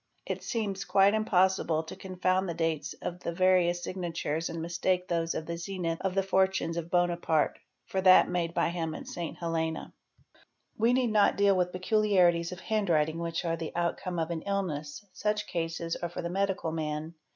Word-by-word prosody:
It - - -3
seems 205 -4 -2
quite 195 +1 +4
impossible 190 -6 +2
to 160 - -9
confound 185 0 -1
the 170 - -3
dates 165 -2 -1
of 180 0 -4
the 170 - -3
various 175 -1 +3
signatur 170 -4 -3
and 165 - -5
mistake 180 +2 0
those 165 -1 -1
of 160 - -3
the 170 +1 -4
zenith 170 -2 -3
of 190 -1 -1
the 195 - +2
fortunes 190 -3 +1
of 170 -1 -4
Bonaparte 175 -3 +1 0.3
for 190 - -2
th 185 -1 +7
made 170 -1 -2
by - - +2
him 165 -2 -3
at - - -7
St. 170 -2 -5
Helena. 160 -1 -2 0.4
'id - - -26 0.4
We 230 +2 +3
need 250 -3 +2
not 210 -1 +4
deal 200 -1 +4
with 180 -1 +1
peculiarities 185 -3 +2
of 180 +1 -8
handwriting 165 -7 +1
which 170 +1 -3
are 165 -1 +1
#l 160 - -3
outcome 175 +1 -2
of 165 0 -1
an 165 -1 -3
illness; 170 -4 -3
such 210 +1 -1
cases 165 0 -3
are 175 - -4
for 175 - -6
the 170 - -2
medical 195 -3 -1
man. 155 0 -3
175 Hz, 185 wpm, -29 LUFS, 165-190 Hz, 0.4 s, th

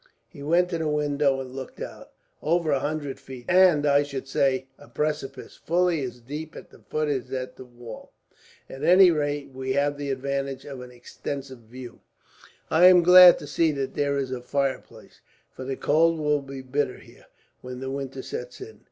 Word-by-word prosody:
He 140 - -14
went 170 +5 +2
to 170 - -2
the 160 - -1
window 145 -2 +1
and 130 -1 -7
looked 135 -1 -8
out. - - -8 0.3
"Over 165 0 +1
a 140 - +2
hundred 145 -1 -4
feet," 130 -2 -11
he 180 - +1
said, 185 0 +8
"and 150 -4 0
I 145 0 +4
should 140 -2 -5
say 135 -1 +1
a 145 - -15
precipice 150 -3 -4
fully 175 -1 +1
as 125 -2 -6
deep 150 +6 -7
at - - -11
the - - -17
foot 155 0 -3
of 135 -4 -2
the 130 0 -6
wall. 120 -2 -11 0.6
At 135 +2 -9
any 180 +2 +7
rate, 145 -2 -2
we 130 0 -3
have 145 +1 0
the 145 -1 -4
advantage 135 0 -3
of 135 -3 -8
an 125 - -10
extensive 130 +2 -7
view. 120 +2 -12 0.7
"I 170 +3 +7
am 180 -1 +7
glad 180 0 +9
to - - -9
see 165 -2 +1
that 135 -2 -3
there 140 -1 0
is 135 -2 -2
a 125 -1 -4
fireplace, 135 +2 -4 0.3
for 130 - -9
the 135 0 -4
cold 165 +2 +3
will 150 -1 +1
be 135 -1 -9
bitter 130 0 -2
here, - - -18 0.3
when 125 0 -8
the 135 0 -5
winter 135 -1 -5
sets 125 0 -7
in. 110 -2 -11
140 Hz, 195 wpm, -25 LUFS, 130-155 Hz, 0.7 s, glad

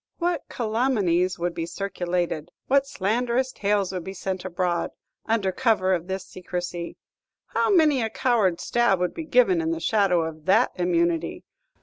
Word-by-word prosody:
"What 345 0 -1
calumnies 215 -7 +1
would 175 0 -2
be 165 0 -4
circulated, 175 -4 -2 0.2
what 275 +1 +3
slanderous 245 +3 0
tales 200 -3 0
would 180 -2 -4
be 190 +2 -7
sent 190 0 -3
abroad, 180 -1 -1 0.4
under 215 -4 +1
cover 200 -4 +2
of 175 -1 -2
this 190 0 -4
secrecy! 175 -1 -5 0.5
How - - +1
many 310 -9 +4
a 225 - -1
coward 215 -9 +1
stab 240 -5 +2
would 180 0 0
be 325 - -6
given 240 - +4
in 160 - -1
the 165 0 -1
shadow 190 -3 +2
of 160 -1 -7
that 220 +6 +4
immunity! 170 -2 0
190 Hz, 155 wpm, -25 LUFS, 175-235 Hz, 0.5 s, many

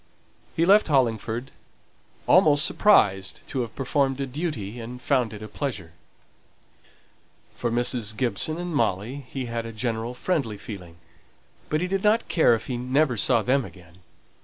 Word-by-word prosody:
He 165 - +2
left 205 +3 +5
Hollingford, 120 -3 0 0.7
almost 150 0 +5
surprised 100 - +3
to 130 - -1
have 115 -2 -6
performed 135 0 0
a 135 - -1
duty, 125 - -4
and 120 +2 -7
found 125 -3 +1
it 105 -1 -9
a - - -6
pleasure. 105 - -5 1.6
For 120 - -2
Mrs. 120 -3 0
Gibson 130 +6 -1
and 175 -1 -4
Molly 115 0 0
he 135 -2 -4
had 115 -1 -3
a - - -6
general 115 +1 -3
friendly 135 - -1
feeling; 90 -6 -9 0.7
but 155 +1 0
he 180 - 0
did 195 +1 -2
not 215 +2 +3
care 140 -8 +4
if 110 - -6
he 125 - -3
never 130 +2 +1
saw 110 +1 +3
them 135 +1 +2
again. 90 -2 -14
125 Hz, 155 wpm, -25 LUFS, 110-145 Hz, 1.6 s, left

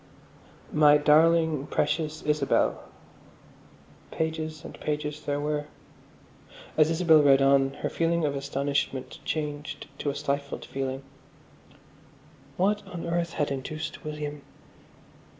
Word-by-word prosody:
"My 150 -1 +6
darling, 155 0 +4
precious 155 -1 -1
Isabel." 150 -2 +1 1.2
Pages 160 -1 -3
and - - -8
pages 150 0 -3
there 145 0 -2
were. 150 0 -2 1.1
As 155 0 +5
Isabel 165 -2 +5
read 140 -2 +6
on 135 0 +4
her - - +1
feeling 165 -1 +1
of 140 -1 -1
astonishment 140 -1 -2
changed 150 -1 -4
to 145 - -1
a 140 - -3
stifled 140 -1 -3
feeling. 135 0 -4 1.5
What 205 +3 +2
on 170 -1 -6
earth 170 0 -1
had 145 -2 -1
induced 145 +4 -5
William...? 150 -1 -5
150 Hz, 110 wpm, -27 LUFS, 140-160 Hz, 1.5 s, My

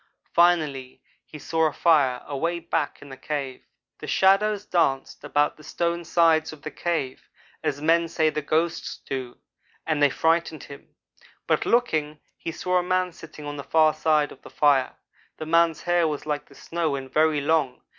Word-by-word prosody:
Finally 155 -7 +2 0.3
he 155 - -10
saw 160 +2 0
a - - -2
fire 140 -7 +2
away 165 +5 -2
back 165 -3 -3
in 145 - -13
the 135 - -8
cave. 135 -2 -5 0.3
"The - - -8
shadows 200 +2 +3
danced 140 -10 0
about 145 0 +1
the 155 - -15
stone 170 +2 -2
sides 160 -1 +3
of 150 -3 -13
the - - -5
cave 160 -7 -3 0.3
as 145 +1 -2
men 165 +1 +3
say 160 -1 +1
the 150 - -3
ghosts 160 +3 -1
do; 130 -3 -5 0.5
and 155 -2 0
they 145 - +6
frightened 160 +1 0
him. 140 - -13 0.5
But - - 0
looking, 155 -11 +1 0.2
he 165 - -6
saw 180 +2 0
a - - -2
man 185 0 0
sitting 155 -2 -11
on 145 0 -5
the 140 - -6
far 155 0 +3
side 155 -1 +1
of - - -14
the - - -13
fire. 140 -3 +2 0.4
The 155 - -6
man's 165 0 +2
hair 175 -1 +2
was 150 -1 -4
like 150 -1 -3
the 140 - -17
snow 165 -2 -2
and 135 -1 -7
very 155 -1 +3
long. 145 -3 0
155 Hz, 180 wpm, -25 LUFS, 145-170 Hz, 0.5 s, they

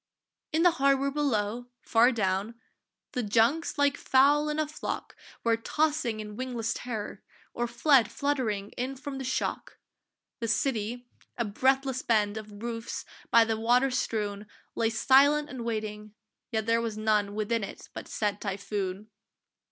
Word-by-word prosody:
In 320 +2 +2
the 355 - +7
harbour 275 0 +3
below, 245 -5 -1 0.2
far 235 +2 +4
down, 205 0 -1 0.6
The 250 - -1
junks 235 +11 +2
like 285 0 +3
fowl 290 +3 +4
in 300 - -2
a 310 -1 0
flock 305 - -5 0.3
Were 230 -1 +3
tossing 290 -1 0
in 210 -1 -7
wingless 240 -2 -2
terror, 220 -5 -5 0.3
or 240 0 -1
fled 240 0 +4
Fluttering 235 -9 -1
in 255 +2 -4
from 270 0 -6
the - - -4
shock. 255 - -3 0.6
The 230 - -2
city, 235 0 -1 0.3
a 235 - 0
breathless 265 +4 +1
bend 210 -3 +1
Of 215 -1 -8
roofs, 230 -1 -4 0.2
by 230 -1 +6
the 225 -1 -1
water 245 +4 +3
strewn, 210 -4 -2 0.3
Lay 225 - +1
silent 280 +6 +4
and 255 -3 -5
waiting, 215 -2 -4 0.4
yet 220 -2 -1
there 230 +1 +2
was 225 -2 -3
none 210 -2 +1
Within 215 +1 0
it - - -8
but - - -7
said 205 -1 -2
typhoon! 200 0 -4
230 Hz, 150 wpm, -28 LUFS, 215-265 Hz, 0.6 s, the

